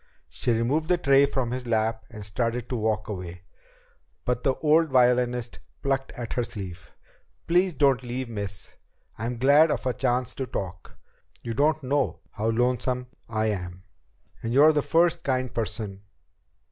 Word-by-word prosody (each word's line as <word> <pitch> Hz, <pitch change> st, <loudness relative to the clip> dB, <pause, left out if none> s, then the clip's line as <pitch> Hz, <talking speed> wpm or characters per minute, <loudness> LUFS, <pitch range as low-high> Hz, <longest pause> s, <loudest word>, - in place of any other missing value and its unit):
She -, -, -1 dB
removed 125 Hz, +8 st, +1 dB
the 180 Hz, -, +4 dB
tray 140 Hz, -3 st, +5 dB
from 130 Hz, -4 st, -2 dB
his 125 Hz, 0 st, -4 dB
lap 110 Hz, -1 st, 0 dB
and 105 Hz, -3 st, -9 dB
started 115 Hz, +3 st, -1 dB
to 125 Hz, -, -2 dB
walk 110 Hz, -2 st, -1 dB
away, 90 Hz, -3 st, -6 dB, 0.8 s
but 125 Hz, -1 st, 0 dB
the 135 Hz, 0 st, +1 dB
old 160 Hz, +2 st, +3 dB
violinist 125 Hz, -2 st, +2 dB, 0.2 s
plucked 135 Hz, -1 st, 0 dB
at 120 Hz, -2 st, -5 dB
her 125 Hz, -, 0 dB
sleeve. 90 Hz, -8 st, -8 dB, 0.5 s
"Please 180 Hz, 0 st, +2 dB
don't 135 Hz, -2 st, +3 dB
leave, 125 Hz, +1 st, -4 dB
miss. 100 Hz, -4 st, -3 dB, 0.4 s
I'm 120 Hz, +2 st, -3 dB
glad 145 Hz, +6 st, +6 dB
of -, -, -2 dB
a 125 Hz, -, +1 dB
chance 125 Hz, -1 st, 0 dB
to 130 Hz, -, -4 dB
talk. 95 Hz, -5 st, -6 dB, 0.5 s
You 115 Hz, -, -3 dB
don't 150 Hz, +4 st, +2 dB
know 140 Hz, +1 st, 0 dB
how 110 Hz, +1 st, -1 dB
lonesome 125 Hz, +1 st, 0 dB, 0.2 s
I 110 Hz, -1 st, 0 dB
am. 90 Hz, -2 st, -6 dB, 0.6 s
And 115 Hz, +2 st, -2 dB
you're 150 Hz, +3 st, +7 dB
the 150 Hz, -, +2 dB
first 170 Hz, +2 st, +2 dB
kind 130 Hz, -2 st, -1 dB
person 105 Hz, -3 st, -3 dB
125 Hz, 160 wpm, -26 LUFS, 110-135 Hz, 0.8 s, you're